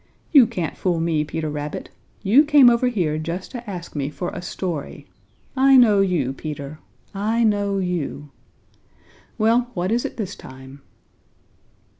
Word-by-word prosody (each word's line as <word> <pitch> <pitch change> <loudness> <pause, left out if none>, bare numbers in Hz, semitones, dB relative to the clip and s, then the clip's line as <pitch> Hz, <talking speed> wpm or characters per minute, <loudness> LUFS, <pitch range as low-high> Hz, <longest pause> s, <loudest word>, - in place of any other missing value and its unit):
"You 275 -7 +7
can't 170 -6 -4
fool 175 -3 0
me, 165 -2 0
Peter 155 +1 -4
Rabbit. 150 0 -5 0.3
You 225 +9 +5
came 290 -5 +6
over 235 +2 +2
here 170 -10 -1
just 170 +4 -5
to 240 -3 -8
ask 175 -4 -8
me 140 -1 -2
for 175 +4 -5
a - - -7
story. 175 -4 -5 0.5
I 270 0 +5
know 215 -5 +5
you, 170 -9 0
Peter! 150 +1 -7 0.3
I 220 +4 0
know 205 -2 +1
you! 170 -6 -3 1.1
Well, 235 +2 +2
what 180 +2 -1
is 235 +1 +1
it - - -6
this 205 -3 -4
time?" 130 +1 -13
180 Hz, 150 wpm, -22 LUFS, 155-225 Hz, 1.1 s, You